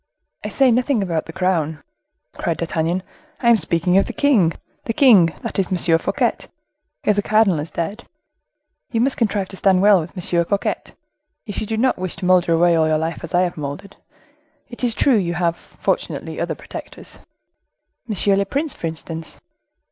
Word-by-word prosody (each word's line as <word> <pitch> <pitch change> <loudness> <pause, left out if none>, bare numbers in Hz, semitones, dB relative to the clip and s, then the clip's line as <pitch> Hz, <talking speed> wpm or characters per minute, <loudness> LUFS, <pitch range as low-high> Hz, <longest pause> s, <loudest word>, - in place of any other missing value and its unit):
"I - - -3
say 270 -2 +3
nothing 245 -2 +1
about 165 -4 -2
the - - -7
crown," 160 -4 -1 0.5
cried 165 - -2
D'Artagnan; 170 +2 -1 0.4
"I 235 - +2
am - - +7
speaking 175 0 +2
of - - 0
the - - -5
king—the 225 - 0
king, 220 -10 +6 0.2
that - - -3
is 190 - +1
M. 175 -3 +2
Fouquet, - - 0 0.7
if 210 - +2
the 205 - +1
cardinal 215 -5 +3
is 150 +2 -5
dead. 200 +8 -4 0.9
You 230 - 0
must 260 +3 +1
contrive 205 -4 0
to 190 - -8
stand 190 -1 +3
well 205 -2 +6
with 165 +4 -8
M. 175 -1 0
Fouquet, 200 +4 -1 0.6
if 205 - -5
you 215 - -4
do 220 - -2
not 255 -1 +1
wish 185 -1 -4
to - - -6
molder 180 -2 +3
away 170 +1 +4
all 160 -1 +3
your 155 0 +2
life 160 +2 -3
as 165 - -4
I 180 - +4
have 175 -2 -3
moldered. 150 +7 -6 0.7
It 240 +1 -10
is 235 -2 +1
true 265 -5 +3
you 175 -3 -1
have, 170 0 0
fortunately, - - -4
other - - -2
protectors." - - -10 0.9
"M. 200 -1 +3
le 200 - +1
Prince, 295 +2 -2
for 165 - -4
instance." 160 0 -7
185 Hz, 185 wpm, -20 LUFS, 165-215 Hz, 0.9 s, am